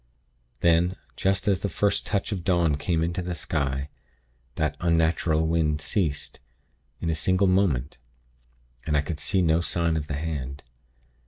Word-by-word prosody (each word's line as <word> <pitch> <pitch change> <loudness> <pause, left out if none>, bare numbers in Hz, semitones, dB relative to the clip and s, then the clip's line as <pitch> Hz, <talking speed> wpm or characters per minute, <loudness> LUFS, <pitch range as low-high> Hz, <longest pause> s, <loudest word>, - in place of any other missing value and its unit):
"Then, 85 +2 +3 0.2
just 95 +1 0
as 100 -2 +3
the 100 - -2
first 100 +2 0
touch 105 +1 -1
of 95 -4 -3
dawn 85 -5 +2
came 80 +3 0
into 85 +2 -1
the 90 0 -4
sky, 70 -3 -2 0.7
that 75 -1 0
unnatural 80 -1 +2
wind 80 -2 +1
ceased, 80 -4 -1 0.6
in 85 - -1
a - - +1
single 95 +5 +2
moment; 85 -10 +1 0.9
and 75 -2 +2
I - - +3
could 75 +1 -5
see 90 +4 +1
no 80 0 +3
sign 85 -1 0
of 75 -2 -2
the 75 - -3
hand. 70 -3 -4
80 Hz, 155 wpm, -26 LUFS, 75-90 Hz, 0.9 s, Then